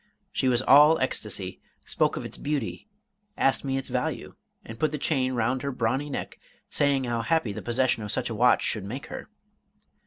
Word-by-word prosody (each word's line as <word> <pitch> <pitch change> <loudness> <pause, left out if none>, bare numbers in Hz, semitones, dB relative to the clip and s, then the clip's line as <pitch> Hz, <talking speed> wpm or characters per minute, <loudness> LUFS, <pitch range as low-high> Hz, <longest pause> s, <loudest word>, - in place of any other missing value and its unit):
She 130 - 0
was 125 0 +3
all 150 +4 +7
ecstasy, - - -2 0.2
spoke - - +1
of - - -5
its - - -7
beauty, 145 - -3 0.5
asked 135 - +2
me 135 -1 -1
its 135 - -4
value, - - -3 0.3
and 115 0 -9
put 155 - +1
the 150 - -2
chain 130 -3 0
round 125 +2 0
her 140 - -2
brawny 130 +4 -1
neck, 140 - -5 0.3
saying 140 -2 +2
how 120 -2 -1
happy 120 -3 0
the - - -6
possession 120 -1 +1
of 105 -1 -4
such - - -1
a 115 - -3
watch 120 +3 +4
should 110 - -1
make 120 +8 -6
her. - - -7
130 Hz, 190 wpm, -26 LUFS, 115-140 Hz, 0.5 s, all